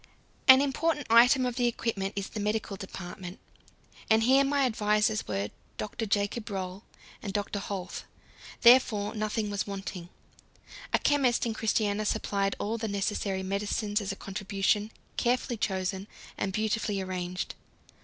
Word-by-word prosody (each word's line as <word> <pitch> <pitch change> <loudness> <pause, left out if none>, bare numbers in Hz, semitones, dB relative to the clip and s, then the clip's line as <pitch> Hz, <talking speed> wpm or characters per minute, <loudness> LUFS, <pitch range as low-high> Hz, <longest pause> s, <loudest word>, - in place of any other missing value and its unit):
An 260 0 +10
important 295 +1 0
item 245 +3 +7
of 245 -1 -2
the 245 -1 +3
equipment 215 -4 -2
is 200 -1 -3
the 215 - -6
medical 210 0 -1
department, 185 -1 -8 0.7
and 220 0 +5
here 265 +3 +5
my 280 0 +2
advisers 215 -2 +1
were 100 +1 -2 0.3
Dr. 220 +1 -4
Jacob 205 +2 -1
Roll 190 0 -4 0.4
and 200 - -4
Dr. 205 0 -2
Holth; 195 -2 -5 0.6
therefore 225 -4 +5
nothing 215 -1 -2
was 205 0 -2
wanting. 195 -3 -6 0.8
A - - +4
chemist 265 -5 +2
in 230 - -1
Christiania 215 -1 0
supplied 200 -1 0
all 225 +3 -2
the 220 - -2
necessary 200 -1 -1
medicines 205 +2 -1
as 200 -1 -3
a - - -4
contribution, 200 +2 -1 0.3
carefully 245 0 +1
chosen, 190 -1 -2 0.3
and 195 - -2
beautifully 215 0 -1
arranged. 185 -1 -3
210 Hz, 140 wpm, -29 LUFS, 195-230 Hz, 0.8 s, An